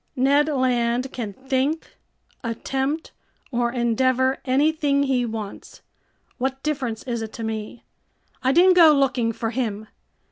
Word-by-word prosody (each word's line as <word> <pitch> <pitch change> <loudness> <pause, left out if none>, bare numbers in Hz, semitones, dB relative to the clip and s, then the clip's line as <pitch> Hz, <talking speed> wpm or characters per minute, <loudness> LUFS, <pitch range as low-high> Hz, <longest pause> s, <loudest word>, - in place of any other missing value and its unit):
"Ned 280 +3 +3
Land 255 -2 0
can 225 -5 -4
think, 265 +6 -2 0.5
attempt, 265 +6 -2 0.4
or 240 -1 0
endeavor 255 +2 +1
anything 280 +1 +2
he 255 -3 +1
wants, 220 -3 -7 0.6
what 265 +1 -2
difference 260 -7 -2
is 235 -3 -3
it 220 -1 -5
to 230 - -6
me? 220 +1 -5 0.6
I 260 - +2
didn't 360 +5 +6
go 330 -4 +7
looking 260 -5 +1
for 225 0 -3
him! 220 -4 -3
255 Hz, 130 wpm, -23 LUFS, 235-275 Hz, 0.6 s, go